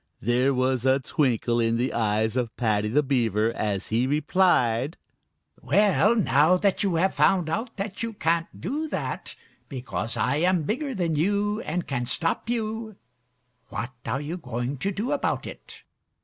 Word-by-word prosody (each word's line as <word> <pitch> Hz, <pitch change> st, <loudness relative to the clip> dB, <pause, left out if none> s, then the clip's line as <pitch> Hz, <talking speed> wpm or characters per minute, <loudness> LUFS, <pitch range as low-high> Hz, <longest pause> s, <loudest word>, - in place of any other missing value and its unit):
There 125 Hz, +4 st, +2 dB
was 130 Hz, -1 st, +1 dB
a 130 Hz, +1 st, +3 dB
twinkle 120 Hz, -4 st, 0 dB
in 115 Hz, 0 st, +2 dB
the 125 Hz, +3 st, -1 dB
eyes 110 Hz, 0 st, 0 dB
of 120 Hz, -3 st, -2 dB
Paddy 105 Hz, -3 st, +1 dB
the 145 Hz, +8 st, +2 dB
Beaver 115 Hz, -5 st, +1 dB
as 105 Hz, -4 st, -2 dB
he 115 Hz, +3 st, +1 dB
replied: 145 Hz, -4 st, +2 dB, 0.6 s
"Well, 210 Hz, +2 st, +3 dB
now 170 Hz, -4 st, +4 dB
that 195 Hz, +1 st, +1 dB
you 195 Hz, -4 st, +1 dB
have 185 Hz, +4 st, +2 dB
found 175 Hz, -5 st, +2 dB
out 225 Hz, +7 st, -3 dB
that 195 Hz, +1 st, -4 dB
you 230 Hz, -1 st, -3 dB
can't 165 Hz, -3 st, 0 dB
do 305 Hz, +4 st, -3 dB
that, -, -, -4 dB, 0.3 s
because 125 Hz, -4 st, -4 dB
I 130 Hz, +3 st, +1 dB
am 175 Hz, +1 st, +2 dB
bigger 260 Hz, -, -2 dB
than 170 Hz, -5 st, 0 dB
you 205 Hz, +6 st, +1 dB
and 175 Hz, 0 st, -3 dB
can 120 Hz, -3 st, -2 dB
stop 165 Hz, -, -2 dB
you, 220 Hz, -2 st, -3 dB, 0.7 s
what 120 Hz, +2 st, -4 dB
are 135 Hz, -, -2 dB
you 155 Hz, +5 st, -4 dB
going 125 Hz, -2 st, -4 dB
to 200 Hz, -, -1 dB
do 215 Hz, +8 st, -3 dB
about 290 Hz, -, -1 dB
it?" -, -, -11 dB
150 Hz, 165 wpm, -25 LUFS, 120-195 Hz, 0.7 s, now